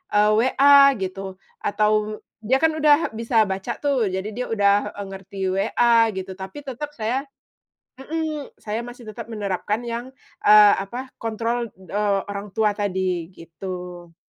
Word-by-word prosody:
eee, 210 +1 +5
WA 275 +4 +6
gitu 190 0 -5 0.3
atau 215 +1 0 0.2
dia 245 +5 +2
kan 320 +2 +3
udah 305 0 +3
bisa 225 0 +2
baca 195 +5 -4
tuh, 270 -7 +1
jadi 190 +1 -3
dia 250 +3 -3
udah 205 -1 +2
e 205 - -6
ngerti 195 0 -10
WA 230 +4 +3
gitu, 190 0 -5
tapi 190 +9 -9
tetap 295 +3 -6
saya 245 +5 -2 0.7
mhm, 310 0 -4
saya 215 +2 -3
masih 245 -1 -11
tetap 230 +2 -8
menerapkan 205 0 -2
yang, 235 +2 -4 0.3
eee, 210 -1 +8
apa, 245 +7 -6
kontrol, 230 +1 -2
eee, 200 +2 -1
orang 200 0 -6
tua 215 -1 +1
tadi, 185 -4 -2
gitu. 175 0 -8
215 Hz, 145 wpm, -23 LUFS, 195-245 Hz, 0.7 s, eee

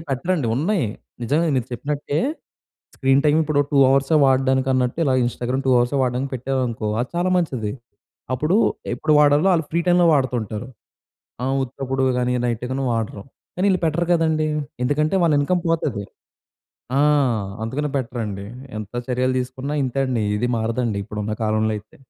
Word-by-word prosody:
ఇలాంటివి - - -11
పెట్టరండి, 135 0 0
ఉన్నాయి. 165 - +1 0.4
నిజమే. 155 +7 +1
మీరు 125 -2 -1
చెప్పినట్టే, 145 +3 -2 0.8
స్క్రీన్ 135 0 +3
టైమ్ 150 +1 +4
ఇప్పుడు 150 -2 +1
2 145 - +2
అవర్స్ 135 +3 +2
వాడడానికన్నట్టు, 130 0 +2
ఇలా 135 -3 +2
ఇన్‌స్టాగ్రామ్ 125 +2 -2
2 - - +3
అవర్స్ 120 +3 +1
వాడడానికి 130 +2 -1
పెట్టారనుకో, 125 -3 -2
అది 125 - -3
చాలా 180 +1 +1
మంచిది. 130 -12 -1 0.6
అప్పుడు, 150 +9 +1 0.4
ఎప్పుడు 155 - 0
వాడాలో 150 +5 +4
ఆ‌ళ్ళు 165 -3 0
ఫ్రీ 170 - +1
టైమ్‌లో 175 0 +4
వాడుతుంటారు. 125 -4 -1 0.8
ఆహ్, 135 +1 0
ఉత్తప్పుడు 135 +1 -3
గాని 125 0 0
నైట్‌గనీ 125 +3 -2
వాడరు. 110 -3 -3 0.3
కానీ 185 +2 0
ఈళ్ళు 185 - +1
పెట్టరు 165 +2 +1
కదండీ. 160 -2 +2 0.4
ఎందుకంటే, 150 +6 +1
వాళ్ళ 165 -2 +3
ఇన్కమ్ 175 +5 +1
పోతది. 150 -10 -1 0.9
ఆ! - - +3 0.6
అందుకనే 145 +6 -2
పెట్టరండి. 115 -6 -4 0.3
ఎంత 105 -1 -7 0.2
చర్యలు 130 0 0
తీసుకున్నా 130 +3 -4
ఇంతే 130 +1 -2
అండి. 125 -4 -1
ఇది 115 +4 0
మారదండి 115 -1 -1
ఇప్పుడున్న 105 +1 -4
కాలంలో 110 0 +1
అయితే. 105 +1 -15
130 Hz, 145 wpm, -22 LUFS, 120-150 Hz, 0.9 s, టైమ్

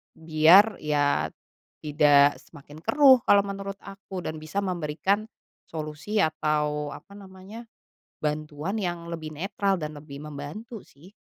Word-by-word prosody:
Biar, 165 +7 +5
ya 145 -1 +1 0.6
tidak 145 -1 +4
semakin 145 +2 -14
keruh 275 - +6
kalau 200 0 +5
menurut 195 0 -6
aku 195 -1 -8
dan 155 - -4
bisa 155 +6 -3
memberikan 185 +4 -1 0.4
solusi 155 +6 -5
atau 150 -1 -1
apa 200 - -14
namanya, 195 +4 -12 0.5
bantuan 150 +4 -3
yang 175 -2 -3
lebih 160 -2 -5
netral 195 +4 -1
dan 155 -1 -5
lebih 145 -1 -10
membantu 180 - -8
sih, 175 +9 -19
160 Hz, 125 wpm, -26 LUFS, 150-195 Hz, 0.6 s, keruh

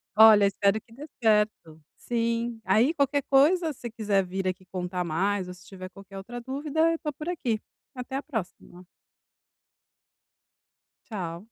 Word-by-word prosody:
Olha 215 -2 +8
espero 200 +1 +2
que 230 - -21
dê 290 +5 -9 0.2
certo. 210 -8 +1
Sim. 235 0 -2
Aí 255 +9 +3
qualquer 285 -1 +1
coisa, 310 +5 +4
se 240 -2 -7
quiser 210 -4 +1
vir 190 +1 -3
aqui 185 0 -3
contar 180 0 -3
mais 185 +4 0
ou 180 - -7
se 180 0 -17
tiver 185 -1 -9
qualquer 195 0 -12
outra 235 +5 -7
dúvida 290 +6 0
eu 330 - -2
tô 300 - -3
por 305 +4 -8
aqui. 245 -11 -1 0.4
Até 255 +1 -6
a 275 - -2
próxima. 185 - -7 2.2
Tchau. 175 -3 -5
220 Hz, 150 wpm, -27 LUFS, 190-270 Hz, 2.2 s, Olha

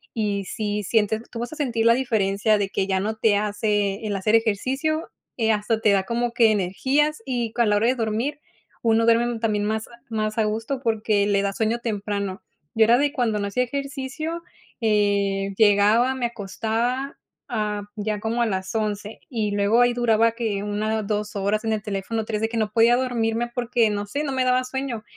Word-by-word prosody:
y 205 -3 -1
sí 210 -1 -2
sientes 220 +1 +1
Tú 230 - -8
vas 240 +5 -4
a - - -7
sentir 240 -7 -1
la 230 - +7
diferencia 215 -4 +1
de 200 -1 -1
que 195 - -1
ya 190 -1 +1
no 215 +3 -2
te 215 -2 +3
hace 205 0 -1
el 205 - -1
hacer 195 +3 0
ejercicio, 265 +9 0 0.3
eh, 225 -1 +2
hasta 215 +1 0
te 215 -2 +3
da 195 -1 +3
como 235 +3 -1
que 230 -2 +5
energías 260 +9 +1
y 240 -3 -2
con 235 -3 +2
la 205 - +3
hora 220 - +1
de 255 - +4
dormir, 230 +6 -2 0.4
uno 225 0 +3
duerme 230 +1 +3
también 210 -2 0
más 220 +1 -2 0.2
más 215 0 -2
a 220 - +3
gusto 225 +5 -2
porque 215 -2 +1
le 200 -1 +2
da 200 0 -1
sueño 225 +3 0
temprano. 205 -3 -3 0.3
Yo 225 -1 +5
era 235 +2 +5
de, 285 +1 +1
cuando 230 -5 0
no 200 - -2
hacía 250 +5 0
ejercicio, 280 +5 -4 0.4
eh, 200 -2 +1
llegaba, 220 +4 +4
me 255 -2 -2
acostaba 235 +5 -2 0.3
a 210 -3 -2
ya 210 0 -2
como 225 +2 -1
a 235 - +3
las 190 -1 -3
11:00, 210 -1 -3
y 220 -5 -1
luego 205 +3 +3
ahí 245 0 +4
duraba 230 -1 +3
que 220 -4 -2
una, 215 +1 -1
dos 210 0 -3
horas 200 +2 0
en 220 - 0
el 210 -1 -3
teléfono, 210 +2 -3
tres, 215 -1 -3
de 225 - 0
que 230 - -4
no 215 -1 0
podía 235 +1 +5
dormirme 240 -2 -1
porque, 240 -2 +1
no 205 0 -2
sé, 285 +8 -2
no 280 - -2
me 260 - +1
daba 255 0 +3
sueño. 255 -3 -4
220 Hz, 200 wpm, -23 LUFS, 205-240 Hz, 0.4 s, la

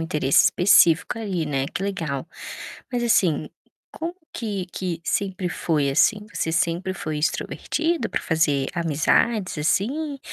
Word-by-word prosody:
interesse 150 -4 +3
específico 180 +1 +4
ali, 190 -7 -2
né, 135 -3 -1
que 175 - -5
legal. 165 -8 -3 0.7
Mas 245 -1 0
assim, 180 -10 +2 0.4
como 340 +2 -5 0.2
que 205 -5 -3
que 180 -3 -3
sempre 190 -1 -1
foi, 150 -6 0
assim? 210 +9 +2
Você 160 - -1
sempre 175 +2 0
foi 155 -4 -4
extrovertido 320 - -1
para - - -1
fazer 150 -5 +1
amizades, 170 +5 +1
assim, 275 - 0
180 Hz, 130 wpm, -23 LUFS, 155-205 Hz, 0.7 s, específico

